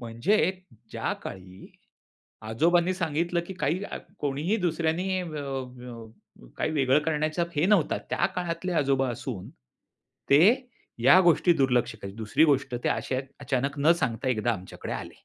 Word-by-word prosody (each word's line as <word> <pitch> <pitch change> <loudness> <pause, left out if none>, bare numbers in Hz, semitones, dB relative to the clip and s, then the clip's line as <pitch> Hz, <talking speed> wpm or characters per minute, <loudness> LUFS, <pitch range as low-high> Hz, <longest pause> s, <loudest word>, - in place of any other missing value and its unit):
म्हणजे 125 - +1 0.4
ज्या - - -2
काळी 95 0 -9 0.8
आजोबांनी 170 +9 +2
सांगितलं, 170 0 -1
की 190 - -7
काही 185 +1 -1
आ, - - -6 0.2
कोणीही 150 +9 -1
दुसऱ्यांनी 175 +3 0
अ, - - -4
अ, 125 - -8
काही 155 - -1
वेगळं 135 -2 +3
करण्याचा 155 +2 0
हे 150 - +3
नव्हता. 195 -6 +3
त्या - - +2
काळातले 175 0 -2
आजोबा 135 -1 +1
असून 115 -4 -6 0.8
ते 140 +2 +7 0.6
या 140 +9 +7
गोष्टी 175 0 +4
दुर्लक्ष 125 -4 +1
करीत. 100 0 -7
दुसरी 110 +7 +2
गोष्ट 140 -4 +1
ते - - +2
असे - - -1
आहेत 130 +1 -3
अचानक 140 +1 -2
न 155 +4 +5
सांगता 125 0 -1
एकदा 120 -1 +1
आमच्याकडे 95 -4 -7
आले. - - -6
145 Hz, 145 wpm, -27 LUFS, 125-170 Hz, 0.8 s, ते